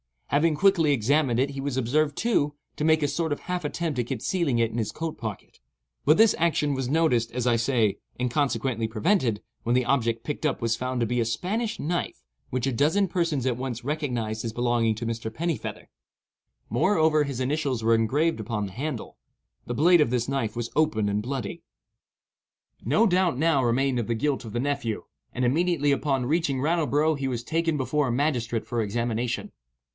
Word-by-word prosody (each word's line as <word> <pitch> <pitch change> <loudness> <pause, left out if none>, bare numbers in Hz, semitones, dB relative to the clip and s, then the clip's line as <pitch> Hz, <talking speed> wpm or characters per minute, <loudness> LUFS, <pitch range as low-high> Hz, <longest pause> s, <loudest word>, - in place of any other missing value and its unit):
Having 150 +2 +3
quickly 165 -3 +4
examined 135 0 +2
it 135 +2 +1
he 135 -1 -5
was 140 -2 -2
observed, 145 +4 +1
too, 150 -11 +1 0.2
to 150 - -1
make 155 -1 +4
a - - +3
sort 160 +2 -1
of - - -7
half 180 -3 -3
attempt 155 -2 -2
at 120 - -1
concealing 140 +2 -1
it 115 -1 +1
in 115 - -5
his 110 -3 -1
coat 160 -1 -4
pocket; 110 -4 -7 0.5
but 155 +3 +5
this 220 0 +6
action 155 -3 +2
was 135 -2 -2
noticed, 135 -7 +2
as 125 -1 -2
I 120 -2 +3
say, 115 -4 +1 0.2
and 125 -1 -1
consequently 125 -4 0
prevented, 115 - +1 0.2
when 120 +1 +1
the 125 -1 +2
object 115 -4 +1
picked 150 - -4
up 145 - 0
was 115 -1 0
found 125 0 -2
to - - +3
be 120 +2 -1
a 115 - +2
Spanish 210 - -2
knife 170 +3 -3 0.3
which 130 0 -1
a 135 - +1
dozen 160 - +2
persons 165 -8 0
at 125 -3 0
once 125 -2 -4
recognized 120 -7 -2
as 115 - -3
belonging 120 -2 +1
to 115 - -5
Mr. 115 -1 -3
Pennifeather. 165 +6 -4 0.8
Moreover, 155 - +3
his 135 -3 -4
initials 135 -3 -1
were 115 +1 +4
engraved 135 +8 +1
upon 110 -1 -2
the - - -10
handle. 130 +3 -5 0.5
The 120 - -3
blade 170 +4 +5
of 150 - +3
this 125 0 0
knife 135 -6 -1
was 120 0 -4
open 110 -10 +2
and 100 +1 0
bloody. 135 +7 -4 1.2
No 225 - +3
doubt 180 - +2
now 155 -2 +2
remained 125 +2 +1
of 115 - -2
the 115 - 0
guilt 135 +2 -1
of 110 - -8
the 120 - -1
nephew, 140 -4 -2 0.3
and 125 0 0
immediately 150 +2 +2
upon 135 -2 0
reaching 145 -1 0
Rattleborough 155 0 +2
he 135 - -1
was 120 -3 -3
taken 165 +2 0
before 140 +2 0
a - - 0
magistrate 120 -4 0
for 120 -2 -1
examination. 115 +3 -2
135 Hz, 195 wpm, -26 LUFS, 115-155 Hz, 1.2 s, this